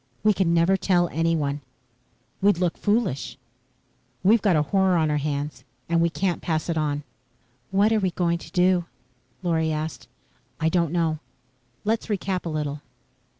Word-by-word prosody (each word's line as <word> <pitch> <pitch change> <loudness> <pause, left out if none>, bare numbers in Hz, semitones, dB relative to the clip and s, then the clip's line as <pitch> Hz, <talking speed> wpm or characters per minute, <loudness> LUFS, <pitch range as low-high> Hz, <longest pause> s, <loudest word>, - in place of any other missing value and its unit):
"We 215 0 +5
can 185 -3 +1
never 170 +3 +4
tell 175 -3 +2
anyone." 155 -3 0 0.8
"We'd 200 -2 +4
look 175 -1 0
foolish." 205 - -1 0.9
"We've 215 +3 +5
got 195 -5 +3
a 150 - +3
horror 190 +2 +2
on 155 -2 +2
our 150 - +1
hands 145 -3 -3 0.2
and 170 0 +2
we 170 - +3
can't 180 +1 -1
pass 160 0 -1
it 170 - 0
on." 145 -1 -1 0.7
"What 205 +3 +3
are 220 - +3
we 190 -2 +1
going 170 -1 0
to 160 - -11
do?" 180 0 +3 0.6
Lorry 160 -2 +1
asked. 155 0 -4 0.5
"I 160 - +2
don't 170 -2 +1
know. 165 -3 0 0.7
Let's 225 +2 0
recap 190 -4 -2
a - - -2
little. 150 -2 -3
170 Hz, 160 wpm, -25 LUFS, 155-190 Hz, 0.9 s, We